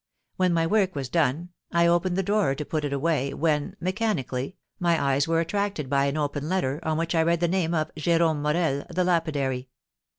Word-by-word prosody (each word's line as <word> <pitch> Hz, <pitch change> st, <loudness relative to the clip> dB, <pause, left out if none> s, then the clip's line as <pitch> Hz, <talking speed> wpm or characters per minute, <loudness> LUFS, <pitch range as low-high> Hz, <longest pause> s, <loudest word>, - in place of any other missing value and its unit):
When 185 Hz, -1 st, +2 dB
my 165 Hz, -1 st, +2 dB
work 190 Hz, 0 st, +1 dB
was 135 Hz, -3 st, -3 dB
done 165 Hz, +2 st, 0 dB, 0.2 s
I 170 Hz, 0 st, +3 dB
opened 175 Hz, +1 st, +2 dB
the 195 Hz, -, +1 dB
drawer 200 Hz, -8 st, +1 dB
to 150 Hz, -, -5 dB
put 155 Hz, 0 st, -2 dB
it 145 Hz, -, -2 dB
away, 140 Hz, -1 st, 0 dB
when, 150 Hz, -2 st, 0 dB
mechanically, 185 Hz, -, -2 dB, 0.2 s
my 170 Hz, -2 st, +2 dB
eyes 140 Hz, +1 st, +1 dB
were 165 Hz, 0 st, +2 dB
attracted 180 Hz, -5 st, -2 dB
by 140 Hz, 0 st, +3 dB
an 140 Hz, +2 st, -1 dB
open 145 Hz, 0 st, -2 dB
letter, 155 Hz, -7 st, 0 dB
on 160 Hz, -1 st, -1 dB
which 165 Hz, +1 st, -1 dB
I 165 Hz, -, +3 dB
read 170 Hz, +1 st, +2 dB
the 175 Hz, -, +2 dB
name 170 Hz, -1 st, 0 dB
of 155 Hz, -1 st, -1 dB
Jérome 160 Hz, -1 st, +1 dB
Morel, 150 Hz, -2 st, 0 dB
the 180 Hz, -, 0 dB
lapidary. 145 Hz, -7 st, 0 dB
160 Hz, 200 wpm, -26 LUFS, 145-175 Hz, 0.2 s, I